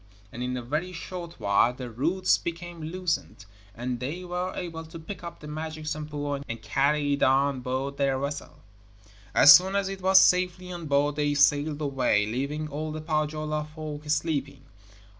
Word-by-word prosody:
And 120 - -7
in 125 0 -2
a 125 - -5
very 155 +9 -2
short 170 0 -7
while 100 +4 +3
the 125 -2 -7
roots 170 +11 +1
became 170 0 -6
loosened, 165 - -3 0.3
and 125 +1 -3
they 150 +9 -4
were 180 +1 -3
able 165 -2 -5
to 160 +1 -10
pick 170 +4 -8
up 170 - -8
the 150 - -9
magic 155 +1 -6
Sampo 150 -1 -3
and 115 0 -5
carry 145 +1 +1
it 140 - -2
on 135 +1 +3
board 130 +2 -3
their 135 -1 +1
vessel. 140 +2 -5 0.7
As 145 - +10
soon 185 +6 +5
as 200 -1 +1
it 195 -1 -6
was 190 +1 +7
safely 180 0 +2
on 170 -3 -6
board 145 +1 +2
they 145 -1 +1
sailed 145 +1 +3
away, 130 -7 +2
leaving 140 +7 -3
all 155 +1 -4
the 155 - -5
Pohjola 155 -1 -1
folk 150 -1 -6
sleeping. 145 -3 -1
150 Hz, 175 wpm, -27 LUFS, 140-170 Hz, 0.7 s, As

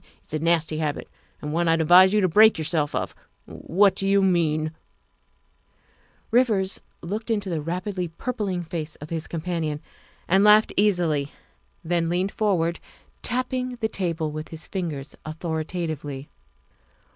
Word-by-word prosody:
It's - - -14
a 155 - 0
nasty 160 -1 +1
habit, 150 -2 -2 0.4
and 150 0 -3
one 170 +1 +1
that 165 - +5
I'd 165 - +2
advise 180 +4 +7
you 210 0 +3
to 185 - +4
break 215 +6 +6
yourself 155 -2 -1
of. - - -2 0.3
What 195 +2 +2
do 195 0 -2
you 195 0 +4
mean? 155 -4 +2 0.6
' - - -42
' - - -36
Rivers 220 -6 +2 0.2
looked 210 +7 -4
into 205 -4 -1
the 160 -2 -1
rapidly 180 +3 -3
purpling 190 0 -3
face 165 -2 -5
of 150 +2 -11
his 165 -2 -3
companion 165 -3 -3 0.5
and 190 +3 +4
laughed 210 +1 +6
easily, 170 -8 +2 0.5
then 165 0 0
leaned 180 +3 0
forward, 170 -6 0 0.4
tapping 255 0 -1
the 225 -2 -1
table 165 -7 -2
with 155 +1 -6
his 160 -1 -7
fingers 155 -7 -5
authoritatively. 155 -3 -4
170 Hz, 150 wpm, -24 LUFS, 155-195 Hz, 0.6 s, advise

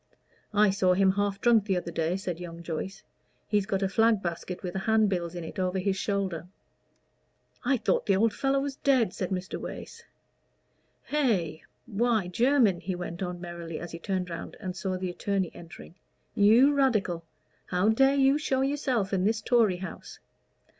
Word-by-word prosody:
"I 210 -1 +5
saw 185 -2 +2
him 190 0 +4
half 200 0 -1
drunk 230 -2 +4
the 190 -3 +1
other 175 -1 -4
day," 165 +2 -1
said 180 -4 -4
young 170 -1 -8
Joyce. 170 +4 -5 0.4
"He'd 205 -2 +1
got 195 0 0
a - - +2
flag 225 +2 +3
basket 175 +2 -4
with 180 -1 -4
handbills 190 -4 +1
in 175 - -5
it 160 - -7
over 185 0 0
his 190 +1 0
shoulder." 195 -4 -2 1.2
"I 260 +1 +2
thought - - 0
the 195 - +4
old 215 +2 +2
fellow 275 0 +1
was 275 -1 -4
dead," 255 -8 +2
said 185 - -3
Mr. 185 -1 -4
Wace. - - -8 1.0
"Hey! 210 - 0 0.2
why, 225 -4 0
Jermyn," 235 -2 +3
he 185 +2 -3
went 175 +1 -6
on 180 -1 -3
merrily, 170 -2 -6
as 175 -1 -7
he 165 - -7
turned 185 0 -2
round 165 - -7
and 185 -4 -5
saw 185 0 -2
the 185 -1 -3
attorney 190 0 -1
entering; 170 -1 -12 0.4
"you 230 +8 +5
Radical! 215 -11 +1 0.4
how 180 +4 +2
dare 270 +5 +4
you 275 +1 +4
show 265 -3 0
yourself 265 -8 0
in 185 -1 +1
this 220 +2 +2
Tory 220 -4 +3
house? 190 +1 -8
195 Hz, 175 wpm, -28 LUFS, 180-225 Hz, 1.2 s, I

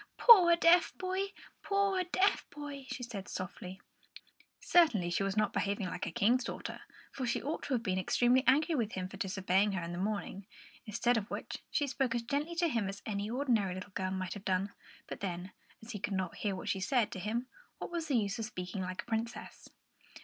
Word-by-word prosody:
"Poor 365 -8 +9
deaf 340 +1 +4
boy! 375 +2 -1 0.3
poor 395 -2 +1
deaf 375 +3 +1
boy!" 285 -2 -8
she 250 - -5
said 210 -6 -6
softly. 185 +1 -6 0.8
Certainly 235 - +4
she 175 - 0
was 195 +1 -1
not 215 -1 +2
behaving 200 0 -1
like 180 - -4
a - - -4
King's 240 +9 +3
daughter, - - -6 0.3
for 260 -2 -3
she 235 - +1
ought 295 +4 -3
to 270 - 0
have 230 - -2
been 185 -4 0
extremely 245 +6 +3
angry 300 +6 +4
with 230 -7 -1
him 185 -1 -3
for 195 - -10
disobeying 190 +1 +1
her 185 -3 -2
in 170 - -5
the 175 - -4
morning, 200 -1 -3 0.4
instead 235 +3 +2
of 210 -2 -3
which - - -5
she 290 - +1
spoke 265 -3 -1
as 235 - -1
gently 290 +7 -2
to 340 0 +2
him 230 -10 0
as 200 +1 -8
any 205 -1 -2
ordinary 230 -7 +1
little 185 +2 -8
girl 185 -1 -1
might 185 -1 -3
have 205 - -9
done. 190 +1 0 0.3
But - - -7
then, 185 -2 -4 0.3
as 225 - -8
he 210 - -5
could 210 0 -2
not 185 -2 -2
hear 200 -3 -1
what 185 - -7
she 195 - 0
said 230 +3 +1
to 190 - -5
him, 225 +6 -2 0.3
what - - -6
was 335 -2 -3
the 275 -5 +2
use 205 -1 -1
of 225 - -2
speaking 180 -3 -5
like 185 0 -4
a - - -26
princess? 230 0 -4
215 Hz, 215 wpm, -33 LUFS, 190-275 Hz, 0.8 s, Poor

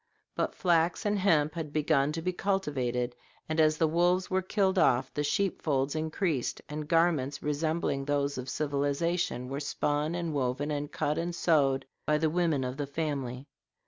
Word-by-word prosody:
But - - -1
flax 170 +2 +2
and 205 -1 +1
hemp 155 -6 +3
had 160 -3 -5
begun 150 -1 +2
to 165 0 -4
be 185 +1 0
cultivated, 130 -11 -1 0.3
and 155 0 -1
as 155 0 +4
the 160 - +3
wolves 175 +4 +2
were 190 0 +2
killed 190 0 +1
off 130 -4 +3
the 150 - -1
sheep 190 +6 0
folds 135 -2 0
increased, 155 -3 -1
and 150 0 -5
garments 160 -5 +1
resembling 150 -1 -1
those 140 -1 0
of 125 - -5
civilization 145 -1 -1
were 135 +2 -4
spun 150 +2 -1
and 170 -2 -2
woven, 135 +2 -1
and 145 0 -3
cut 150 +2 -1
and 170 +1 -2
sewed, 140 -6 +2 0.2
by 150 - +3
the 155 0 +1
women 165 -5 +1
of 125 +1 -4
the 145 -1 -3
family. 140 -4 -3
150 Hz, 175 wpm, -29 LUFS, 140-170 Hz, 0.3 s, as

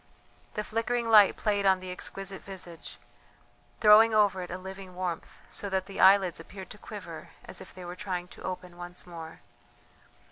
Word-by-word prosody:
The 210 - -1
flickering 230 +2 -1
light 210 -3 +7
played 205 -2 +1
on 190 -1 +4
the 185 0 -6
exquisite 195 +1 -5
visage, 180 -4 -9 0.8
throwing 220 +1 +7
over 205 -3 +4
it 180 - -6
a 180 - -4
living 190 0 -9
warmth, 180 -2 -4
so 200 - -4
that 190 -1 0
the 195 -1 -8
eyelids 190 -3 +6
appeared 190 +3 -10
to 210 - -10
quiver 185 -8 -8 0.2
as - - -6
if - - -11
they 185 0 -10
were 175 +1 -6
trying 180 -2 -4
to - - -13
open 180 -1 -6
once 175 0 -7
more. 165 -2 -9
190 Hz, 175 wpm, -29 LUFS, 180-205 Hz, 0.8 s, light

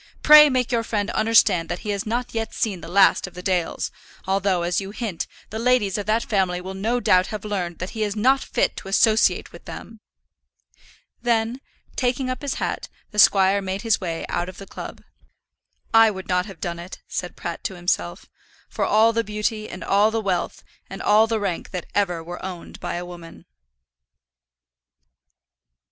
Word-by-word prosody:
Pray 300 0 +9
make 255 -2 0
your 235 -1 +2
friend 210 -2 -2
understand 215 -7 +3
that 175 - -4
he 210 - -1
has 200 +1 -3
not 240 +2 -2
yet 225 -1 -3
seen 195 -6 -1
the - - -9
last 190 +2 +4
of 180 - -13
the 180 - -8
Dales; 180 -3 -1 0.3
although, 190 -2 +1
as 175 +3 0
you 195 - -6
hint, 205 -5 -4 0.2
the 220 - -4
ladies 230 -5 +2
of 205 -1 -3
that 220 +2 +1
family 190 -4 0
will 190 +1 -7
no 220 +6 -1
doubt 185 -5 +3
have 215 -1 -6
learned 180 -5 -3
that 185 - -5
he 220 - -5
is 205 -1 -1
not 260 +6 +3
fit - - 0
to - - -8
associate 215 +3 +3
with - - -14
them." 225 -1 -9 1.2
Then, 235 +1 0 0.3
taking 255 +1 0
up 255 - -5
his 285 -2 -2
hat, - - -3 0.2
the 210 - -3
squire 195 0 +5
made 190 +1 -4
his 225 -2 +2
way 165 -3 -3
out 175 - -2
of 185 - -11
the 195 - -9
club. - - -9 0.9
"I 225 0 +7
would 190 -2 -7
not 180 +1 0
have 195 -5 -11
done 170 -1 -4
it," 175 +2 -10
said 180 - -4
Pratt 170 -1 -6
to 190 - -3
himself, 90 - -2 0.4
"for - - -2
all 220 +2 +4
the 230 0 +1
beauty, 215 +1 -3
and 175 -1 -7
all 200 +4 +3
the 225 0 -1
wealth, 190 -5 -2 0.3
and - - -7
all 215 +2 +4
the 225 -1 0
rank 195 -4 -3
that 180 -2 -5
ever 180 -5 0
were 175 +2 -8
owned 185 -2 -7
by - - -4
a 175 +1 -4
woman." 170 -2 -11
200 Hz, 190 wpm, -23 LUFS, 180-225 Hz, 1.2 s, Pray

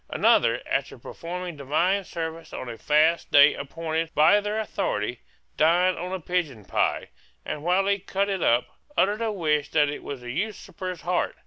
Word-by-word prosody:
Another, - - +3
after - - -2
performing 175 0 -6
divine 170 +8 +1
service 165 -1 -6
on - - -6
a 115 -1 -6
fast 155 +3 +2
day 145 +1 +7
appointed 160 +3 -3
by 170 +8 +5
their 210 +1 -2
authority, 125 - -2 0.4
dined 175 +4 +4
on 180 +1 -5
a 190 - -3
pigeon 155 - -2
pie, - - 0 0.4
and 150 - -4
while 180 +3 +2
he 200 0 +1
cut 195 +1 -1
it 195 -3 -2
up, 120 +1 +3 0.3
uttered 205 +3 +2
a 225 -1 0
wish 150 -6 0
that 150 -2 +3
it 145 - -5
was 140 -3 -7
the 120 0 -6
usurper's 185 - -5
heart. 175 +2 -1
170 Hz, 175 wpm, -25 LUFS, 150-190 Hz, 0.4 s, day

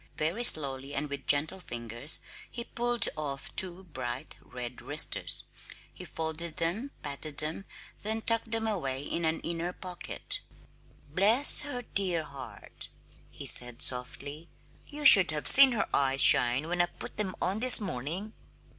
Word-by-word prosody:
Very 170 +10 -4
slowly, 140 - +4
and 150 -1 -5
with 140 -1 -8
gentle 155 +6 -2
fingers, 120 -1 -4 0.3
he 235 - -8
pulled 240 -1 -2
off 140 -3 -9
two 185 0 -1
bright 135 -4 -9
red 125 -1 -11
wristers. - - -1 0.5
He - - -13
folded 160 +1 -8
them, 195 +12 -4
patted 145 +1 -7
them, 160 +5 0 0.4
then 220 +1 -5
tucked 230 0 -1
them 225 0 -5
away 140 -11 -5
in 165 +3 -5
an 160 0 -3
inner 170 +1 -6
pocket. 180 -1 -5 0.7
"Bless 220 - +6
her 250 -4 -7
dear 185 -7 -2
heart!" 135 -3 -12 0.4
he - - -12
said 120 -1 +3
softly. 145 +5 -4 0.4
"You 295 0 -8
should 195 -9 +9
have 150 -1 -4
seen 270 -2 +9
her 220 - -3
eyes 135 -1 0
shine 125 +5 +5
when 175 +1 -2
I 175 - -1
put - - -12
them 195 -4 -3
on 190 +4 -4
this 250 +1 +7
morning!" 185 - -7
165 Hz, 150 wpm, -27 LUFS, 140-210 Hz, 0.7 s, should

